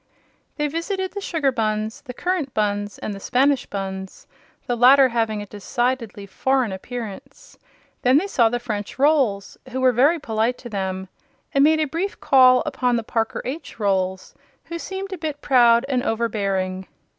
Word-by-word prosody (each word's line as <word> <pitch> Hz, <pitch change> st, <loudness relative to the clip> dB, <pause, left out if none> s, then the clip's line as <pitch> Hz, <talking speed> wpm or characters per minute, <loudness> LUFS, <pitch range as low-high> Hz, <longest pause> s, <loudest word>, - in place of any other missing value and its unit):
They 295 Hz, -, 0 dB
visited 375 Hz, +5 st, -3 dB
the 405 Hz, -, -5 dB
Sugar 315 Hz, -8 st, 0 dB
Bunns, 215 Hz, -2 st, -2 dB
the 250 Hz, -, -9 dB
Currant 350 Hz, -6 st, -2 dB
Bunns 205 Hz, -1 st, -1 dB
and 210 Hz, -, -5 dB
the 195 Hz, -, -8 dB
Spanish 270 Hz, +5 st, +1 dB
Bunns, 190 Hz, -1 st, -6 dB, 0.4 s
the 245 Hz, -, -1 dB
latter 260 Hz, +3 st, +6 dB
having 225 Hz, -3 st, -1 dB
a -, -, -9 dB
decidedly 230 Hz, +1 st, -3 dB
foreign 255 Hz, +3 st, 0 dB
appearance. 245 Hz, -, -8 dB, 0.4 s
Then 255 Hz, +2 st, +4 dB
they 340 Hz, -, +1 dB
saw 240 Hz, -, +3 dB
the 245 Hz, -, -1 dB
French 210 Hz, -4 st, -5 dB
Rolls, 265 Hz, -9 st, +1 dB
who 260 Hz, +1 st, -4 dB
were 260 Hz, -1 st, +4 dB
very 275 Hz, +8 st, +3 dB
polite 225 Hz, -3 st, -1 dB
to 240 Hz, -, -10 dB
them, 190 Hz, -2 st, -3 dB, 0.5 s
and 275 Hz, -, +4 dB
made 315 Hz, +1 st, +4 dB
a 310 Hz, -, +2 dB
brief 340 Hz, +7 st, -3 dB
call 255 Hz, -2 st, +5 dB
upon 255 Hz, -4 st, 0 dB
the 230 Hz, -, -1 dB
Parker 225 Hz, 0 st, -2 dB
H. 275 Hz, -1 st, -6 dB
Rolls, 190 Hz, -2 st, -1 dB, 0.3 s
who 335 Hz, 0 st, -6 dB
seemed 385 Hz, +2 st, -5 dB
a 370 Hz, -, -6 dB
bit 305 Hz, -3 st, -4 dB
proud 240 Hz, -3 st, +4 dB
and 260 Hz, -3 st, 0 dB
overbearing. 195 Hz, -5 st, -1 dB
245 Hz, 170 wpm, -22 LUFS, 210-280 Hz, 0.5 s, latter